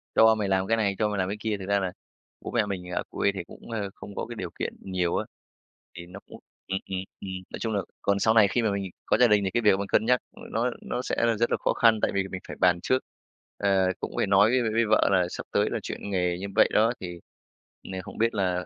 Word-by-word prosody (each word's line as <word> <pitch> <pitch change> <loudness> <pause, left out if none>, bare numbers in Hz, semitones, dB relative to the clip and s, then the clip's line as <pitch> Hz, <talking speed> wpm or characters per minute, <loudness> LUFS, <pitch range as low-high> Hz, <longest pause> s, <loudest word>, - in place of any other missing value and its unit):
cho 110 0 +7
mày 105 -2 -1
làm 95 0 +1
cái 115 0 +2
này, 100 -3 +1
cho 105 -1 +2
mày 105 - -2
làm 95 0 0
cái 105 - -3
kia. 110 -2 -1
Thực 95 - -6
ra 100 +1 +2
là 95 -2 -2 0.5
bố - - -6
mẹ 115 -3 +2
mình 90 -3 -5
ở - - -1
quê 100 - +1
thì 90 - -4
cũng, 105 - -13
ơ, 105 -3 -2
không 100 - -10
có - - -3
cái 120 - -8
điều 90 -5 -5
kiện - - -2
nhiều 90 -3 -1
á, - - -1 0.7
thì 85 - -7
nó 90 +3 -10
cũng - - -12 0.3
ừm, 95 0 -1
ừm, 95 -1 -2 0.2
ừm. 100 - -6 0.2
Nói - - -6
chung 110 -2 -2
là 100 - +1 0.2
còn 100 0 +1
sau 110 +2 +3
này 110 -3 +6
khi 120 +5 0
mà 110 -2 +1
mình 100 0 -2 0.2
có - - +3
gia 125 0 +6
đình 105 -2 +4
thì 95 - -1
cái 120 - +2
việc 105 -3 +5
mình 100 - -3
cân 110 - +2
nhắc 125 +1 +4 0.3
nó 120 +3 +1
nó 125 - -3
sẽ - - -2
là 115 -2 +2
rất 115 +2 +1
là - - +2
khó - - 0
khăn, 115 -2 +4
tại - - +2
vì 100 - +2
mình 95 - -5
phải - - -8
bàn 90 -1 +4
trước, 130 0 +1 0.5
ờ, 95 -2 +2
cũng - - -5
phải - - +1
nói 100 +2 +5
với 130 0 +3
với 110 - 0
với 115 +1 +2
vợ 110 - +4
là 90 -2 +3
sắp - - -6
tới - - +2
là - - -1
chuyển - - -6
nghề 90 -2 0
như 100 - -4
vậy - - +5
đó, 115 +3 +4
thì 90 -2 -6 0.7
n - - -6
không - - -10
biết 115 0 +2
là 90 -3 0
100 Hz, 285 wpm, -27 LUFS, 95-110 Hz, 0.7 s, cho